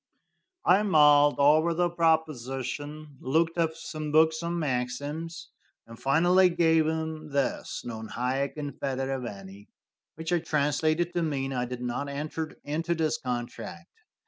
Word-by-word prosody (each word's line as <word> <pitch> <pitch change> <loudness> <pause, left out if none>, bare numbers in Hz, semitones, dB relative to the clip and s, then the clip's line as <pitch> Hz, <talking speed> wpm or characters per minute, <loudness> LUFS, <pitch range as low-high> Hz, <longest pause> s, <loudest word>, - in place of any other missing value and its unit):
I 190 +3 +5
mulled 150 -6 +5
over 155 +4 +4
the 175 +1 +2
proposition, 150 -2 -1
looked 165 +5 +1
up 160 -1 +1
some 155 -2 -6
books 160 +1 +4
on 170 +1 -2
maxims, 145 +4 -3 0.4
and 115 0 -13
finally 175 +6 +4
gave 165 -2 +3
him 160 -1 -3
this, 140 -1 -2
"Non 110 -2 -6
haec 135 +5 -2
in 145 -1 -4
federe 135 0 -3
veni," 100 -3 -9 0.5
which 160 +2 -3
I 175 - +3
translated 155 +3 0
to 175 - 0
mean, 135 -4 -2
"I 125 -1 -1
did 125 0 -6
not 125 +4 -3
enter 155 +2 -4
into 165 +4 -1
this 160 -1 0
contract." 125 +9 -5
150 Hz, 140 wpm, -28 LUFS, 135-160 Hz, 0.5 s, I